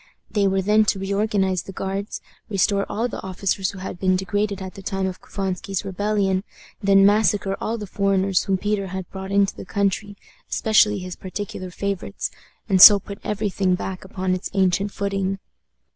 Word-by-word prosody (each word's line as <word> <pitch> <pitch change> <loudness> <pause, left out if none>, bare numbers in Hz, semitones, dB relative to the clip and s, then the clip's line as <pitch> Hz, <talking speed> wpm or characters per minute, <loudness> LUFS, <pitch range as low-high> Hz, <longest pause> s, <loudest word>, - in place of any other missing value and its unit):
They 205 -2 +2
were 190 0 +1
then 210 +2 +4
to 205 - +1
reorganize 195 -1 0
the 195 - -9
Guards, 195 +2 -4 0.3
restore 200 0 +1
all 230 +3 -1
the 240 - -6
officers 190 0 -1
who 200 - -8
had 185 -1 -6
been 185 -1 +2
degraded 200 +2 -1
at 190 -1 -7
the 195 - -10
time 195 0 -2
of 185 -1 -4
Couvansky's 195 0 -3
rebellion, 195 -1 0 0.4
then 195 -1 +5
massacre 205 -1 +3
all 230 +1 -2
the 210 - -6
foreigners 195 -1 +1
whom 195 -1 +1
Peter 205 0 -1
had 190 -1 -5
brought 190 0 -6
into 200 0 +2
the - - -8
country, 200 +1 -1 0.3
especially 215 -1 +3
his 185 -1 -6
particular 185 -1 -6
favorites, 195 - -3 0.4
and 190 -2 +3
so 205 +1 +12
put 200 +1 -9
every 210 -1 -2
thing 185 -1 +1
back 185 0 -5
upon 190 -1 -2
its 185 +1 -3
ancient 195 +1 +2
footing. 195 -1 -2
195 Hz, 175 wpm, -23 LUFS, 190-205 Hz, 0.4 s, so